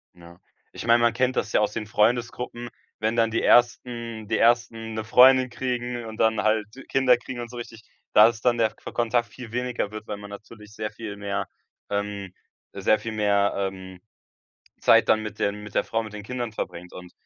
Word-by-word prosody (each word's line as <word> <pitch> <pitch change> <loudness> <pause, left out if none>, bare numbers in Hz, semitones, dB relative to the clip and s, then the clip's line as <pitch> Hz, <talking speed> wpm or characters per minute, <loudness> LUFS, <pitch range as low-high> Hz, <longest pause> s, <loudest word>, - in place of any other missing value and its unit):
Ja, 85 0 -15 0.3
ich - - -8
mein, 120 0 +5
man 120 -1 +3
kennt 130 +2 +1
das 110 - -1
ja - - +4
aus 105 0 0
den 110 - -4
Freundesgruppen, 120 +2 0 0.3
wenn 110 +1 0
dann 115 -1 +2
die 115 - 0
ersten 120 -2 +2
die 110 +1 0
ersten 115 -1 +1
'ne 110 0 -3
Freundin 130 +3 +6
kriegen 120 -1 -3
und 110 -1 -8
dann 110 -1 +2
halt 110 -1 +1 0.2
Kinder 130 -2 +4
kriegen 120 +1 -8
und 120 -1 -6
so 120 - -9
richtig, 115 -1 -9 0.3
da 105 - +8
ist 115 -1 -3
dann 120 -1 +3
der 110 -2 +2
fe - - -10
Kontakt 120 0 0
viel 120 -3 -11
weniger 125 -3 -2
wird, 110 0 -8
weil 105 - -4
man 100 0 -10
natürlich 105 +1 -12
sehr 110 0 -4
viel 110 -3 -7
mehr 100 -1 -3 0.4
ähm, 100 -2 -3 0.4
sehr 110 - +2
viel 115 +2 -5
mehr, 100 -2 +2
ähm 95 -2 -5 0.8
Zeit - - +5
dann 110 - +3
mit 105 0 -7
den 100 +1 -1
mit 105 -1 -10
der - - +2
Frau, 115 0 -2
mit 110 -1 -10
den 105 - -7
Kindern 120 +1 -4
verbringt. 90 -4 -6
Und 90 -1 -10
110 Hz, 205 wpm, -25 LUFS, 105-120 Hz, 0.8 s, da